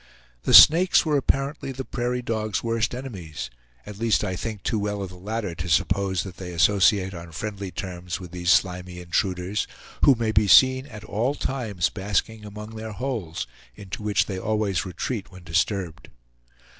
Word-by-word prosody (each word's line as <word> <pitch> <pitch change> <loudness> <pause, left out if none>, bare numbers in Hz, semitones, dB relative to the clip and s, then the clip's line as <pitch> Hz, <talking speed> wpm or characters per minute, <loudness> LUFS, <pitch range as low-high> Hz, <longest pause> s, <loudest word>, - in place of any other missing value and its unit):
The - - +1
snakes 175 +4 +8
were 155 -2 +1
apparently 135 +1 -1
the 130 0 -6
prairie 125 0 -2
dog's 110 -3 -2
worst 115 0 0
enemies, 85 - -7 0.3
at 105 -1 -9
least 115 -2 +2
I 95 - -2
think 110 +1 -5
too 110 - 0
well 105 -1 -2
of 95 - -6
the 90 - -12
latter 100 +1 -4
to 85 +2 -5
suppose 95 +4 +1
that 95 -2 -9
they 90 -2 -7
associate 95 +2 +3
on 85 -1 -9
friendly 100 +3 -5
terms 90 -1 -5
with 90 -3 -10
these 90 -1 -3
slimy 90 -1 +1
intruders, 90 +3 -1 0.4
who 140 - +7
may 115 -2 -1
be 105 -1 +3
seen 130 +5 +6
at 105 -4 -10
all 115 +6 -1
times 110 -12 -1
basking 105 +2 -2
among 105 +1 -8
their 110 -1 -7
holes, 105 - -3 0.3
into 100 - -8
which 105 -1 +1
they 95 -2 -4
always 105 -3 -1
retreat 100 +5 -4
when 95 -1 -13
disturbed. 85 0 -1
100 Hz, 170 wpm, -24 LUFS, 90-115 Hz, 0.4 s, snakes